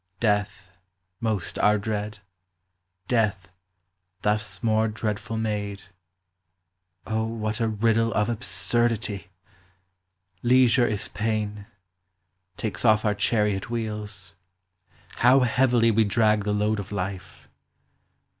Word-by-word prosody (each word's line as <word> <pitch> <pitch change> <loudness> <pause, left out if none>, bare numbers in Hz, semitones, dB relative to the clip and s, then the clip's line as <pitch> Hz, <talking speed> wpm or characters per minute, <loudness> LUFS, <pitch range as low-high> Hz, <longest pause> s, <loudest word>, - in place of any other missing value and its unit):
Death, 105 -3 -1 0.5
most 110 -6 -2
our 105 0 +4
dread; 105 0 -3 0.9
death, 105 -6 0 0.7
thus 105 -1 0
more 110 0 +2
dreadful 110 +1 -3
made: 105 -2 -3 1.2
O, 110 0 -1
what 110 0 -3
a 115 - +1
riddle 115 +1 +1
of 105 - +2
absurdity! 115 -3 -1 1.1
Leisure 125 0 +4
is 105 -2 -1
pain; 105 -1 -3 0.9
takes 110 - -3
off 110 -2 +4
our 105 - +3
chariot 105 -2 0
wheels: 105 -4 -5 0.8
How 130 +3 +5
heavily 120 -1 +3
we 110 +1 +3
drag 105 0 +2
the 105 - 0
load 105 +1 +1
of 100 0 -7
life 95 -2 -5
110 Hz, 100 wpm, -25 LUFS, 105-115 Hz, 1.2 s, How